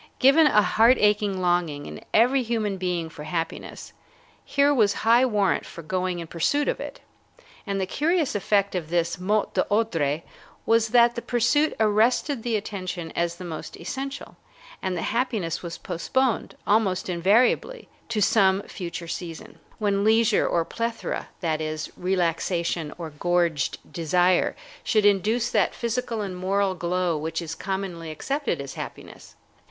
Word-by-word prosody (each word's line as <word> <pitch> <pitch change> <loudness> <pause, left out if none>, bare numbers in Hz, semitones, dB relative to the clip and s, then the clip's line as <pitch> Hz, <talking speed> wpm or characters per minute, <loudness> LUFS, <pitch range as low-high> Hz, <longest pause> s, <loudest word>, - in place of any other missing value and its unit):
Given 285 +4 +6
a 210 -7 +4
heart 230 +6 +4
aching 210 -2 +2
longing 175 -5 0
in - - -9
every 250 +4 +4
human 220 -4 -1
being 180 -3 -2
for 155 -2 -10
happiness, 165 +1 -5 0.5
here 285 +1 +3
was 215 -6 +3
high 240 +3 +5
warrant 205 -5 +1
for 170 - -10
going 185 +2 -2
in 170 - -5
pursuit 175 - 0
of - - -1
it. - - -7 0.7
And 200 -1 -1
the 190 - 0
curious 315 - 0
effect 200 0 +1
of 170 -4 -3
this 170 +1 0
'mot 205 +3 0
d'ordre' 165 -9 0 0.4
was 225 0 +3
that 235 +1 +5
the 235 - -4
pursuit 245 +7 +2
arrested 225 +5 +2
the 230 -1 -1
attention 185 -5 -4
as 170 0 0
the 180 +1 -9
most 160 -2 -7
essential, 270 +10 -6 0.4
and 185 -2 -2
the - - -3
happiness 220 -9 -1
was 170 -1 -6
postponed, 230 +8 -1
almost 200 -3 +2
invariably, 215 - +2 0.2
to 220 -2 -1
some 195 -2 +3
future 170 -2 -7
season, 165 -1 -7 0.2
when 200 -2 +1
leisure 220 0 +3
or 170 -1 +1
plethora, 230 +3 -4
that 160 -3 -1
is, 155 0 -4
relaxation 170 -3 -1
or 165 -3 -6
gorged 170 -1 0 0.2
desire, 175 +2 +2 0.3
should 215 -3 +2
induce 210 +4 +2
that 210 -4 +2
physical 235 -1 -2
and 195 -3 -4
moral 195 +1 +1
glow 180 -1 -1
which 160 +2 -3
is 165 -2 -5
commonly 190 -3 -4
accepted 270 - -2
as 140 -1 -6
happiness. - - -9
195 Hz, 150 wpm, -25 LUFS, 170-230 Hz, 0.7 s, Given